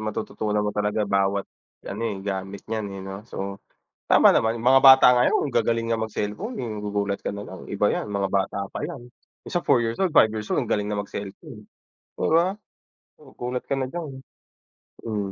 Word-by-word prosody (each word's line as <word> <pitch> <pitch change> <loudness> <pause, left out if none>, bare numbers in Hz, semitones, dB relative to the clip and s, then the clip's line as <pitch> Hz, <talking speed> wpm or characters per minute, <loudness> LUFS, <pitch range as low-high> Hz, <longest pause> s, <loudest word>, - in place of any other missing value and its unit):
matututunan 105 0 -2
mo 105 - -1
talaga 105 +1 0
bawat 100 0 +1 0.4
ano, 105 +3 -5
eh, 105 - -4
gamit 95 0 -4
niyan, 110 -2 -3
eh, - - -7
'no? 95 0 -6
So, 100 -2 -5 0.4
tama - - +6
naman. 115 +1 +1
Mga 130 +3 +5
bata 135 0 +9
ngayon 125 +4 +2
ang - - -8
gagaling 115 0 +1
nga 115 - +1
mag-cellphone, 110 - -4
eh, 120 - -4
magugulat 105 -2 -3
ka - - -2
nalang, 100 -3 -8
iba - - 0
yan - - -1
mga 100 -1 0
bata 95 0 -1
pa - - -5
yan. 120 -2 -7 0.4
Minsan 175 -1 -2
4 120 - +4
years 115 0 -1
old, 185 -4 0
5 110 - +6
years 110 0 -5
old - - +2
ang - - -4
galing 105 - +1
na 100 - -1
mag-cellphone, 105 - -8 0.5
di - - 0
ba? 180 +5 +3 0.6
Magugulat 125 -3 -6
ka 140 - -2
na 130 - -1
diyan, 160 +2 -6 0.9
mm. 105 -3 -3
110 Hz, 190 wpm, -24 LUFS, 100-125 Hz, 0.9 s, bata